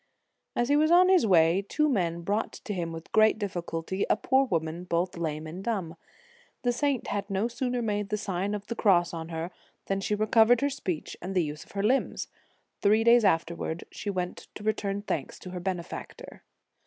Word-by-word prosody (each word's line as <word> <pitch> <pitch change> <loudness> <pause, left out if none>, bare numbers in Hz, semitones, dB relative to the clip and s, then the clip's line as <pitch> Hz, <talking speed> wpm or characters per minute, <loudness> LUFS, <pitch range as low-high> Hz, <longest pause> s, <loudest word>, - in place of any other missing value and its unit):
As 240 +1 +1
he 290 - +4
was 310 +1 +4
on 360 +2 +6
his 365 -11 +5
way, 170 0 +5
two 305 0 +2
men 175 - 0
brought 205 +6 -1
to 210 - -6
him 170 -3 -3
with 165 0 -9
great 220 0 +5
difficulty 185 -2 -3
a - - +5
poor 265 +5 +2
woman 165 -4 -2
both 180 0 -1
lame 155 -2 -3
and 170 +5 -7
dumb. 195 -7 -2 0.7
The 245 - +3
saint 275 0 -1
had 205 0 -2
no 195 +3 0
sooner 245 0 -2
made 205 -2 -1
the 210 - 0
Sign 200 0 -2
of 205 -1 -6
the - - -3
Cross 180 -7 +3
on 165 0 -5
her, 165 +2 -4 0.3
than 195 0 -1
she 210 - 0
recov 220 +1 +4
ered 245 +1 +4
her 285 0 +1
speech 185 - -4
and 190 +2 -5
the 180 - +3
use 150 0 -5
of - - -19
her 200 0 -2
limbs. 255 +6 +1 0.5
Three 215 +2 +4
days 235 0 +6
afterwards, 170 -2 0
she 205 - -5
went 180 -2 -4
to 210 - -8
return 205 -2 -1
thanks - - -3
to 185 - -9
her 180 - -5
benefactor. 175 -1 -6
195 Hz, 205 wpm, -28 LUFS, 170-225 Hz, 0.7 s, on